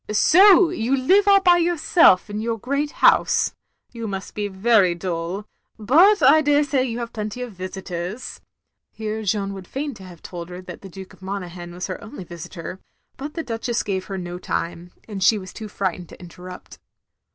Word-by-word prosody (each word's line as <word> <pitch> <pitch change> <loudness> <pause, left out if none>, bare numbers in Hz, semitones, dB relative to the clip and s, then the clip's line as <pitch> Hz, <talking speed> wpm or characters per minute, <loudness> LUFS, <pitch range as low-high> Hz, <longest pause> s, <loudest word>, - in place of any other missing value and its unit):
"So 365 - +6
you 270 -5 0
live 385 +10 +3
all 395 -1 +6
by 355 -2 +5
yourself 335 - +4
in 210 0 -4
your 230 0 -2
great 280 +6 -2 0.2
house. - - +4 0.4
You 230 -2 -6
must 195 -2 -6
be 210 -1 -2
very 195 -2 +3
dull. 175 +3 -4 0.3
But 330 - +4
I 315 - +7
daresay 290 -3 +2
you 235 -2 -4
have 235 -1 -5
plenty 215 +2 -4
of 245 - -7
visitors 185 +3 -6 0.2
— - - -57
" - - -59
Here 220 0 -3
Jeanne 200 -1 -1
would 190 -2 -9
fain 285 +1 -4
have 185 -4 -13
told 175 -1 -8
her 180 0 -8
that 180 -1 -10
the 195 - -10
Duke 190 +1 -11
of - - -20
Mona 190 -2 -5
ghan 175 -1 -9
was 180 +1 -5
her 185 - -6
only 220 -2 -9
visitor, 170 +1 -8 0.4
but 290 +2 -7
the 325 - -3
Duchess 235 -1 -2
gave 190 -2 -3
her 195 - -5
no 175 -1 -6
time, 170 0 -4 0.2
and 205 -3 -6
she 215 +4 +4
was 185 -2 -9
too 220 - -7
frightened 185 -4 -3
to - - -13
in 175 - -11
terrupt. 180 +1 -11
205 Hz, 195 wpm, -22 LUFS, 185-260 Hz, 0.4 s, I